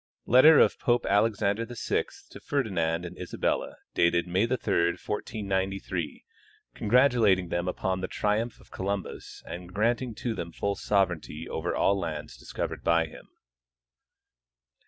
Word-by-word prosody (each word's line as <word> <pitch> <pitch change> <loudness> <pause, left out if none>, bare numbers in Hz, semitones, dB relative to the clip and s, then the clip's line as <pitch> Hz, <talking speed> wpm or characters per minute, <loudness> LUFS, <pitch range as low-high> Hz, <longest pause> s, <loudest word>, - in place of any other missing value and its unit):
Letter 140 +6 +7
of - - +4
Pope 120 -2 +1
Alexander 105 +1 +2
VI 120 0 -1 0.3
to - - -10
Ferdinand 90 - -1
and 90 +1 -7
Isabella, 90 - -2 0.2
dated 85 0 +3
May 95 +5 +1
3, 120 - -1 0.4
1493, 95 -5 -3 0.5
congratulating 115 -6 +3
them 85 +1 -1
upon 95 +1 -1
the 95 - -2
triumph 110 +4 -1
of - - -20
Columbus 100 0 -5
and 90 0 -8
granting 115 +4 0
to 120 +1 -3
them 85 -5 -5
full 100 - -1
sovereignty 85 -7 -1
over 85 +2 -3
all 100 0 +2
lands 80 -4 -5
discovered - - -5
by 85 -1 +3
him. 80 - -13
95 Hz, 130 wpm, -28 LUFS, 85-115 Hz, 0.5 s, Letter